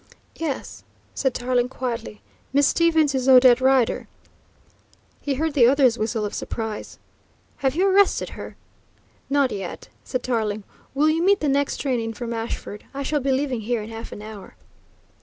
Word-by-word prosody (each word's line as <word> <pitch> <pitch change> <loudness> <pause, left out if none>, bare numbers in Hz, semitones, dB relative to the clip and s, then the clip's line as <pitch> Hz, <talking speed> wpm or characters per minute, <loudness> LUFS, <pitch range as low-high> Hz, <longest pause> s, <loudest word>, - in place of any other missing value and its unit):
"Yes," 315 -5 -4 0.3
said 265 -3 -1
Tarling 245 0 0
quietly. 230 - -5 0.3
"Miss 285 +1 +4
Stevens 320 -2 +3
is 265 0 0
Odette 255 -1 +7
Rider." 260 -2 +2 1.1
He 280 -2 -1
heard 315 +2 -1
the 250 -5 +6
other's 260 -3 +4
whistle 220 0 -1
of 205 - -5
surprise. 220 -2 -5 0.6
"Have 270 0 0
you 365 +4 +2
arrested 390 +1 +3
her?" - - -9 0.7
"Not 280 -2 +2
yet," 195 -3 -6
said 255 - -3
Tarling. 215 -4 -1 0.3
"Will 295 +3 +3
you 325 +2 +1
meet 395 +2 +4
the 300 - -1
next 280 0 +1
train 260 -4 -1
in 225 0 -3
from 235 +1 -4
Ashford? 225 -2 -5
I 280 - -3
shall 295 +2 0
be 275 0 0
leaving 265 -3 0
here 225 0 -2
in 220 - -9
half 225 0 -8
an 205 - -8
hour." 215 -2 -10
255 Hz, 165 wpm, -23 LUFS, 225-285 Hz, 1.1 s, Odette